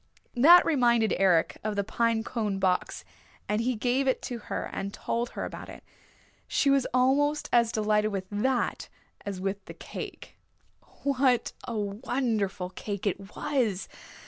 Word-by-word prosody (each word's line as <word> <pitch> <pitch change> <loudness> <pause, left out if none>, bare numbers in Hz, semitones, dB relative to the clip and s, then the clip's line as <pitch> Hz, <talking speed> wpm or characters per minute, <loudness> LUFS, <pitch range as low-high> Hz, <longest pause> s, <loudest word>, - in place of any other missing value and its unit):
That 330 +8 +8
reminded 235 -7 +3
Eric 180 -4 +3
of 215 -1 -2
the 200 - 0
pine 225 +1 0
cone 215 -4 -2
box 185 -1 0 0.4
and 210 +2 0
he 250 +1 0
gave 250 +5 0
it 260 - +1
to 240 -2 -4
her - - -2
and 200 +1 -3
told 235 +3 -2
her - - -2
about - - -8
it. - - -11 0.6
She 280 - +2
was 275 -2 +3
almost 275 +4 +2
as 235 -1 +4
delighted 215 -1 +1
with 195 -2 -3
that 245 +4 -1 0.4
as 195 -2 -4
with 195 +1 -3
the - - -10
cake. - - -8 0.7
What 260 -3 +2
a 235 -2 -3
wonderful 210 -3 -2
cake 200 +1 -5
it 195 0 -3
was! 225 -9 -1
225 Hz, 150 wpm, -28 LUFS, 200-255 Hz, 0.7 s, That